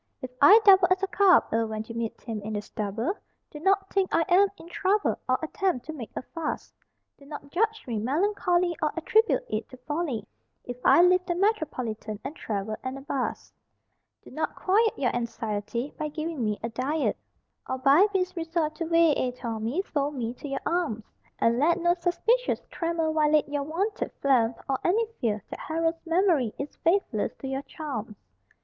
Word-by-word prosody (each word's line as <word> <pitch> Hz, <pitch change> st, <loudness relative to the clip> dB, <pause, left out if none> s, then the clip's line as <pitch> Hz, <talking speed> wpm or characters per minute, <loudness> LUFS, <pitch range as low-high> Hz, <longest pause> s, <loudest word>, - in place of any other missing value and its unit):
If 255 Hz, -, -7 dB
I 400 Hz, +10 st, +9 dB
double 385 Hz, -2 st, +8 dB
as 370 Hz, +1 st, +2 dB
a -, -, +2 dB
cub'll 360 Hz, -, +4 dB
when 215 Hz, 0 st, -4 dB
you 230 Hz, -, -7 dB
meet 230 Hz, -1 st, -4 dB
him 220 Hz, -3 st, -5 dB
in 215 Hz, +2 st, -5 dB
the 205 Hz, -, -2 dB
stubble, 220 Hz, -, -3 dB, 0.4 s
Do 300 Hz, -, -8 dB
not 390 Hz, +3 st, +1 dB
think 390 Hz, -1 st, +2 dB
I 330 Hz, -, +3 dB
am 380 Hz, +3 st, +6 dB
in 330 Hz, -, -13 dB
trouble 390 Hz, +4 st, 0 dB
or 255 Hz, -, +4 dB
at 315 Hz, -, -5 dB
tempt 370 Hz, -11 st, 0 dB
to 315 Hz, -, -6 dB
make 250 Hz, -8 st, -7 dB
a -, -, -4 dB
fuss; 325 Hz, +3 st, -5 dB, 0.5 s
Do 280 Hz, -, -16 dB
not 285 Hz, -1 st, -9 dB
judge 440 Hz, +4 st, 0 dB
me 230 Hz, -4 st, -2 dB
melancholy 350 Hz, -, +1 dB
or 305 Hz, -1 st, +1 dB
at 330 Hz, -, -4 dB
tribute 460 Hz, +3 st, +3 dB
it 215 Hz, +1 st, -3 dB
to 255 Hz, -, -12 dB
folly 275 Hz, -5 st, -3 dB, 0.4 s
If 245 Hz, 0 st, -6 dB
I 340 Hz, -, +7 dB
leave 365 Hz, +1 st, +4 dB
the 345 Hz, -, 0 dB
Metropolitan 255 Hz, -, -1 dB
and 290 Hz, -, -6 dB
travel 215 Hz, -, -3 dB
'n 260 Hz, +1 st, -4 dB
a -, -, -9 dB
bus 275 Hz, -2 st, -3 dB, 0.7 s
Do -, -, -14 dB
not -, -, -3 dB
quiet 430 Hz, +4 st, +2 dB
your 250 Hz, -3 st, 0 dB
anxiety 235 Hz, +1 st, -3 dB
by 305 Hz, -, -1 dB
giving 310 Hz, -2 st, -4 dB
me 210 Hz, -1 st, -1 dB
a 230 Hz, -, -1 dB
diet, 270 Hz, +7 st, -1 dB, 0.5 s
Or 260 Hz, -, -1 dB
by 280 Hz, +9 st, +5 dB
base 370 Hz, -2 st, -1 dB
resort 325 Hz, -2 st, -1 dB
to 330 Hz, -, -3 dB
vi 330 Hz, -2 st, +5 dB
et 250 Hz, 0 st, -3 dB
armis 230 Hz, -, -2 dB
fold 290 Hz, -1 st, -2 dB
me 235 Hz, -2 st, -3 dB
to 270 Hz, -, -9 dB
your 275 Hz, -1 st, -3 dB
arms, 335 Hz, -11 st, -1 dB, 0.3 s
And 230 Hz, +1 st, +2 dB
let 335 Hz, +5 st, +3 dB
no 345 Hz, 0 st, +3 dB
suspicious 375 Hz, +8 st, +1 dB
tremor 330 Hz, -2 st, -1 dB
violate 305 Hz, -1 st, +3 dB
your 290 Hz, 0 st, -2 dB
wonted 385 Hz, -, -2 dB
phlegm 240 Hz, -4 st, +2 dB
or 270 Hz, -1 st, 0 dB
Any 435 Hz, +6 st, +2 dB
fear 215 Hz, -4 st, -1 dB
that -, -, -6 dB
Harold's 325 Hz, +1 st, -2 dB
memory 330 Hz, -, +2 dB
is 280 Hz, +1 st, -6 dB
faithless 335 Hz, -, 0 dB
to 270 Hz, -, -7 dB
your 270 Hz, 0 st, -2 dB
charms. 260 Hz, -9 st, -6 dB
300 Hz, 190 wpm, -27 LUFS, 240-355 Hz, 0.7 s, I